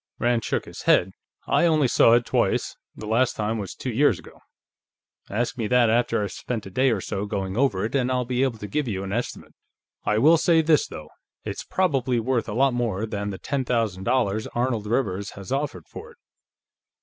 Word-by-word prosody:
Rand 120 -1 +1
shook - - -2
his - - -9
head. 95 +2 +4 0.3
"I 170 - +3
only 155 -4 +3
saw 115 - +5
it 120 0 +3
twice, - - 0 0.2
the - - -8
last 120 +3 +1
time 110 0 -2
two 130 - -4
years 140 +6 +3
ago. - - -15 0.9
Ask 120 +4 -2
me 110 - -1
that 120 -1 +4
after 115 -2 +1
I've 100 - -4
spent 115 -4 -5
a 95 - -9
day 130 +7 +2
or 110 -6 0
so 100 +2 -4
going 95 -2 -3
over 115 -6 +1
it, 110 - -4
and 130 -2 +1
I'll 125 -1 0
be 125 +1 -1
able 130 -4 0
to 105 - -7
give 145 +7 -2
you 95 -4 -3
an 100 0 -4
estimate. 120 +2 -4 0.5
I 105 - +1
will 155 +9 +6
say 165 0 +3
this, 155 -1 +3
though: 75 0 -9 0.4
It's - - -5
probably 135 -9 0
worth 115 -1 -1
a - - -3
lot 135 +1 +3
more 115 -4 -1
than 100 -2 -4
the 95 - -5
ten 140 +4 -2
thousand 110 -7 -1
dollars 110 -4 +1
Arnold 120 -3 -1
Rivers 100 -4 -1
has 100 +3 -9
offered 135 - -3
for - - -10
it." - - -29
115 Hz, 210 wpm, -24 LUFS, 105-130 Hz, 0.9 s, will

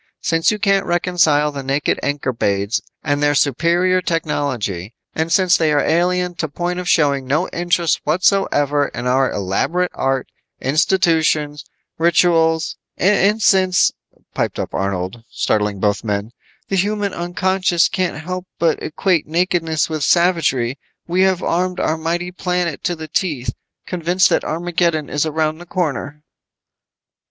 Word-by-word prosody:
Since 165 0 +2
you 210 - 0
can't 195 -2 +1
reconcile 170 -4 +2
the 140 -1 -5
naked 135 +2 -1
Ankorbades 115 -7 -1 0.2
and 145 0 0
their 145 0 +2
superior 170 +7 +2
technology, 130 - -2 0.2
and 160 +1 -2
since 185 -1 +4
they 160 -2 +1
are 145 - +3
alien 180 +2 +1
to 160 - -1
point 175 +4 -3
of 180 -1 -4
showing 140 -4 +2
no 155 +7 +1
interest 170 -1 0
whatsoever 150 -4 +2
in 120 - -6
our 130 +1 +2
elaborate 135 - -1
art, 135 -1 -1 0.3
institutions, 155 -1 +1 0.3
rituals 165 -1 +2
" - - -65
"And 205 +2 +2
since," 185 -1 +4 0.4
piped - - -2
up - - -4
Arnold, 95 +3 -3
startling 105 -2 -1
both 105 +1 0
men, 105 0 -2 0.4
"the 195 - -1
human 205 +1 0
unconscious 175 0 +1
can't 185 -4 -2
help 185 +1 -5
but 165 -2 +1
equate 170 +1 0
nakedness 165 -1 0
with 155 -2 -3
savagery, 145 -7 +2 0.3
we 180 +2 0
have 190 -1 +2
armed 180 +1 -1
our 155 - +1
mighty 170 +2 -2
planet 180 -3 -2
to 175 - 0
the 160 -1 -8
teeth, 150 -6 -2 0.3
convinced 180 +1 +1
that - - +2
Armageddon 170 -2 -1
is 150 +2 0
around 155 0 -1
the 175 - -12
corner." 150 -4 -3
165 Hz, 140 wpm, -19 LUFS, 145-180 Hz, 0.4 s, since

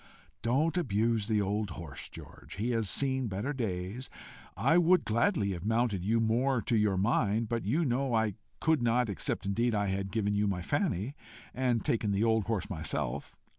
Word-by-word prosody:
"Don't 150 +8 +1
abuse 115 - +1
the 110 -2 +2
old 105 +1 -1
horse, 80 -6 -8
George: - - -11
he 115 +5 -1
has 115 -4 +1
seen 130 -2 +1
better 105 +8 -3
days. 110 0 -4 0.5
I 165 +2 +4
would 175 +1 +4
gladly 115 - +1
have 85 -2 -5
mounted 110 -3 +1
you 110 +4 +2
more 120 +4 +2
to 120 - 0
your 105 -3 +2
mind, 110 +2 +1
but 115 -3 -2
you 150 +11 +1
know 130 -1 0
I 110 -2 +1 0.3
could 160 -4 +2
not 120 0 +2
except 95 - -2
indeed 115 +4 +1
I 100 -1 0
had 95 0 -2
given 105 -2 0
you 105 0 +1
my 90 -3 -2
Fanny, 140 - -1 0.4
and 125 -3 0
taken 105 -3 +1
the 100 +2 +1
old 110 -2 +2
horse 110 -3 -1
myself. 80 -5 -3
115 Hz, 180 wpm, -30 LUFS, 100-125 Hz, 0.5 s, I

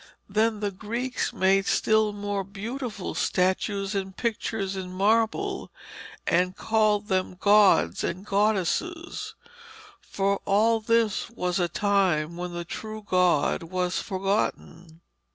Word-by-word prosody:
Then 215 +1 +1
the 205 -1 -1
Greeks 235 +6 -3
made 195 +1 +2
still 220 -1 +3
more 205 -1 -3
beautiful 210 +2 -5
statues 195 +2 0
and 190 -1 -4
pictures 215 -4 -2
in 185 -1 -5
marble, 225 - 0 0.5
and 180 +2 +1
called 215 -2 +1
them 185 -2 -1
gods 205 0 +4
and 185 +3 -3
goddesses, 215 - -1 0.6
for 200 0 -1
all 220 +3 +3
this 225 -1 +1
was 180 -5 -2
at 175 - +2
a 170 - -8
time 185 -6 +1
when 175 0 -5
the 175 0 -5
true 215 +4 -7
God 180 -5 +2
was 180 +2 -2
forgotten. 185 -4 -3
200 Hz, 120 wpm, -26 LUFS, 185-220 Hz, 0.6 s, gods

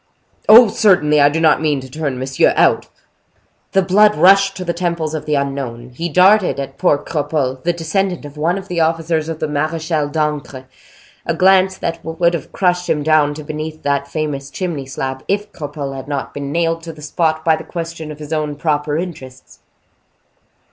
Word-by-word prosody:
"Oh! 230 +2 +10
certainly. 165 -9 +3
I 145 - +6
do 155 +3 -2
not 160 -1 +3
mean 150 -3 +1
to 130 - -10
turn 140 -1 -4
monsieur 130 +1 +1
out." - - +3 0.9
The 195 - +3
blood 210 +3 +4
rushed 195 +1 +5
to 185 - -5
the 170 - -1
temples 170 -3 -2
of 155 - -5
the 150 - +1
unknown; 135 -4 -4
he 165 +8 -4
darted 185 -3 +4
at 135 0 -6
poor 145 - +3
Cropole, 145 -4 -2
the 175 - +2
descendant 170 +1 -2
of 145 0 -10
one 165 +5 0
of 195 0 -8
the 175 -2 -2
officers 165 0 0
of 165 - -4
the 155 - -1
Marechal 155 0 -1
d'Ancre, 150 -3 -3 0.6
a - - 0
glance 190 0 +4
that 165 - -4
would 170 +1 0
have 165 -5 -5
crushed 180 -1 0
him 150 -1 0
down 150 -1 +3
to 155 - -8
beneath 155 +1 -6
that 140 0 0
famous 140 -2 -4
chimney 155 -4 -4
slab, 130 0 -5
if 205 +1 -1
Cropole 145 -2 -6
had 135 0 -8
not 140 -2 -4
been 140 -1 -5
nailed 165 +1 0
to 165 0 -8
the 150 -1 -13
spot 160 0 -1
by 160 -1 +4
the - - -8
question 165 -2 -6
of 150 - -9
his 150 +1 -7
own 150 -2 -2
proper 150 0 -1
interests. 150 -7 -8
155 Hz, 190 wpm, -17 LUFS, 145-170 Hz, 0.9 s, Oh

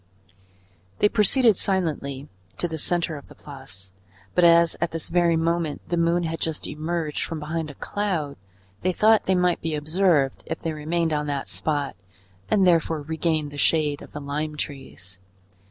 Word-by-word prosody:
They 210 - +4
proceeded 225 0 +4
silently 150 -7 -1 0.3
to 175 - 0
the 160 -1 -5
centre 170 -1 0
of 140 - -12
the - - -15
Place, 135 -10 -10 0.4
but 180 - +3
as 170 -1 +6
at 170 - +1
this 165 -1 -4
very 170 -1 +3
moment 165 -2 -1
the 175 - +1
moon 170 +1 +2
had 165 0 -3
just 160 -2 -2
emerged 155 0 -2
from 160 -1 -4
behind 155 +1 -3
a 145 - -10
cloud, 175 -9 -2 0.5
they 185 0 +1
thought 220 +3 +4
they 190 - +2
might 180 -1 +2
be 160 -1 -2
observed 155 -2 +2
if 165 - -3
they 165 - -3
remained 160 +2 -1
on 150 0 -1
that 140 -2 -2
spot 145 -3 -1 0.5
and 195 -2 +4
therefore 165 -3 +2
regained 160 -1 -1
the 145 - -7
shade 150 -1 +2
of - - -12
the 150 - -6
lime 150 +2 -3
trees. 115 -11 -6
160 Hz, 170 wpm, -24 LUFS, 150-175 Hz, 0.5 s, as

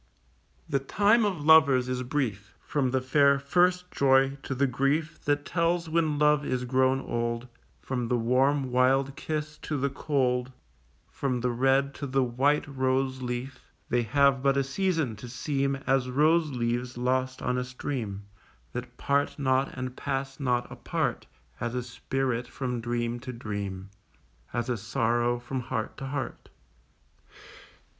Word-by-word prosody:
The 140 - +1
time 205 - +3
of 180 -8 -2
lovers 140 -5 +6
is 125 0 -2
brief; 125 -6 -3
From 140 -4 0
the 130 +1 0
fair 140 +2 +4
first 180 +6 +2
joy 135 0 +3
to 135 - -4
the 140 +2 +2
grief 140 +5 0
That 145 0 +1
tells 170 0 0
when 160 -2 +1
love 150 0 +4
is 125 -2 -2
grown 130 +1 +2
old, 120 0 -2 0.4
From 125 -3 -2
the 125 - +1
warm 130 +3 +2
wild 135 +2 +3
kiss 155 +1 -4
to 150 - -3
the 140 0 0
cold, 130 -3 0 0.6
From 130 -3 -2
the 125 0 +1
red 135 +3 +2
to 140 - -5
the 135 0 +2
white 135 +5 +1
rose 130 -1 0
leaf, 125 +1 -5 0.2
They 120 +1 +2
have 135 +3 +3
but 140 0 +2
a 140 - +3
season 160 - -1
to 120 +2 -9
seem 140 +2 -1
As 135 -1 +2
rose 155 +4 +3
leaves 120 -1 -2
lost 130 +1 -1
on 125 0 0
a - - -1
stream 125 -5 -4 0.5
That 125 0 -6
part 140 0 0
not 130 -1 +1
and 130 0 -4
pass 135 -1 -3
not 125 -3 +1
apart - - -2 0.3
As 120 +1 -3
a 125 - -1
spirit 125 0 -2
from 125 -2 -3
dream 120 0 -2
to 130 +1 -6
dream, 100 -4 -5 0.6
As 120 -1 -2
a 125 -2 -1
sorrow 120 +3 0
from 120 +2 -4
heart 110 -2 -3
to 135 - -5
heart. 130 -2 -5
130 Hz, 155 wpm, -28 LUFS, 125-140 Hz, 0.6 s, lovers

